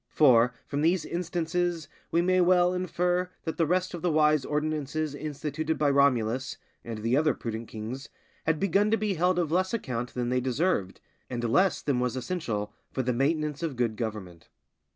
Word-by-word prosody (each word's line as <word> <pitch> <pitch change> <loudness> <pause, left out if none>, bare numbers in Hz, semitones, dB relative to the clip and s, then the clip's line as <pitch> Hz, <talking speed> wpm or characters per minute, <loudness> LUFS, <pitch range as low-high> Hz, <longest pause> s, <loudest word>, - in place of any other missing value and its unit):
For, 125 -4 +5
from 145 - -2
these 165 +1 +2
instances, 175 -1 -2 0.2
we 170 +1 +2
may 185 0 +3
well 180 0 +4
infer 180 0 0
that 160 - -4
the 165 -3 +2
rest 185 +2 0
of 175 - -5
the 175 - +1
wise 155 -2 +3
ordinances 150 0 -2
instituted 150 +2 -3
by 145 -2 +2
Romulus, 130 -2 +2 0.3
and 115 -2 -5
the 115 +3 +2
other 150 -1 +3
prudent 115 0 -5
kings, 115 +5 -6 0.4
had 160 -1 +2
begun 200 +2 +2
to 225 - +3
be 210 -1 0
held 180 +1 +2
of 170 -4 0
less 185 +5 +1
account 125 - -4
than 120 -1 -1
they 125 0 +1
deserved, 130 - 0 0.3
and 120 -1 -3
less 185 +12 +2
than 140 -4 +1
was 125 0 -1
essential 120 - -3 0.2
for 130 - -1
the 125 +1 0
maintenance 150 +3 0
of 160 -5 -2
good 120 -3 0
government. 105 -7 -6
150 Hz, 180 wpm, -28 LUFS, 125-175 Hz, 0.4 s, For